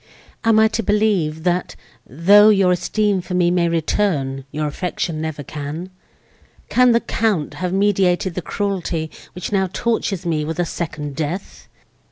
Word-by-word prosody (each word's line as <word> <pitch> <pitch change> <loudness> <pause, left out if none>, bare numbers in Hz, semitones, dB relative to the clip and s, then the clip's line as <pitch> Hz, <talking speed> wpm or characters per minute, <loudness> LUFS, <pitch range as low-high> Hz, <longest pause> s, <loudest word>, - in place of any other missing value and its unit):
am 225 -1 +4
I 220 - +6
to 225 - -1
believe, 205 -8 +1
that, 180 0 -1 0.3
though 200 - +6
your 195 -3 +4
esteem 200 +2 0
for 180 +1 -5
me 175 -1 +3
may 175 -1 +2
return—your 150 -4 -1
affection 160 +1 -3
never 160 -2 -4
can? 150 +6 -6 0.8
Can 250 0 +5
the 235 0 +3
Count 210 -10 -1
have 180 -1 -1
meditated 190 -2 +2
the 180 - -3
cruelty, 175 -6 -3 0.2
which 180 - -5
now 190 -2 +1
tortures 200 -5 -1
me 160 -3 0
with 160 +1 -4
a 175 - +1
second 150 -4 -5
death?" 160 +6 -5
180 Hz, 150 wpm, -20 LUFS, 160-200 Hz, 0.8 s, I